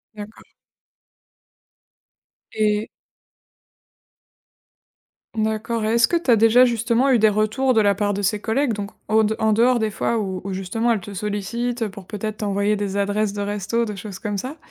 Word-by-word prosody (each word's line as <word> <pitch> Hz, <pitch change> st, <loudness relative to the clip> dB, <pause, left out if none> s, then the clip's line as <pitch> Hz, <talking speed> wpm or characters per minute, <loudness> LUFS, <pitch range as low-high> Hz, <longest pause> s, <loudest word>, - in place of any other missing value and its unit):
D'accord. 210 Hz, +1 st, -10 dB, 2.1 s
Et. 210 Hz, 0 st, 0 dB, 2.5 s
D'accord, 220 Hz, +1 st, -1 dB
est-ce 230 Hz, +2 st, +3 dB
que -, -, 0 dB
tu 335 Hz, -6 st, -2 dB
as 235 Hz, -, +7 dB
déjà, 225 Hz, +3 st, +5 dB
justement, 235 Hz, +2 st, +2 dB
eu 255 Hz, -, +5 dB
des 220 Hz, -, +5 dB
retours 215 Hz, +5 st, +1 dB
de 220 Hz, -, +4 dB
la 200 Hz, -1 st, +3 dB
part 205 Hz, +1 st, 0 dB
de 200 Hz, -, -3 dB
ces 205 Hz, +2 st, 0 dB
collègues, 230 Hz, +4 st, 0 dB
donc 205 Hz, 0 st, -5 dB, 0.2 s
au 220 Hz, 0 st, +3 dB
d 215 Hz, -, +1 dB
en 220 Hz, 0 st, +2 dB
dehors 240 Hz, +3 st, +3 dB
des 220 Hz, -, 0 dB
fois 225 Hz, +2 st, -1 dB
où 190 Hz, -3 st, -3 dB
où 195 Hz, -, -4 dB
justement, 195 Hz, +5 st, -1 dB
elles 220 Hz, -4 st, 0 dB
te 200 Hz, +2 st, -9 dB
sollicitent, 215 Hz, +5 st, -3 dB
heu, 220 Hz, -, 0 dB
pour 195 Hz, -1 st, -11 dB
peut-être 215 Hz, +1 st, -5 dB
t'envoyer 205 Hz, 0 st, 0 dB
des 200 Hz, -1 st, -3 dB
adresses 205 Hz, +1 st, 0 dB
de 205 Hz, -, -4 dB
resto, 205 Hz, +3 st, -1 dB
des 210 Hz, -2 st, -5 dB
choses 195 Hz, -1 st, -8 dB
comme 205 Hz, 0 st, -3 dB
ça. 260 Hz, +9 st, -6 dB
215 Hz, 175 wpm, -22 LUFS, 205-230 Hz, 2.5 s, as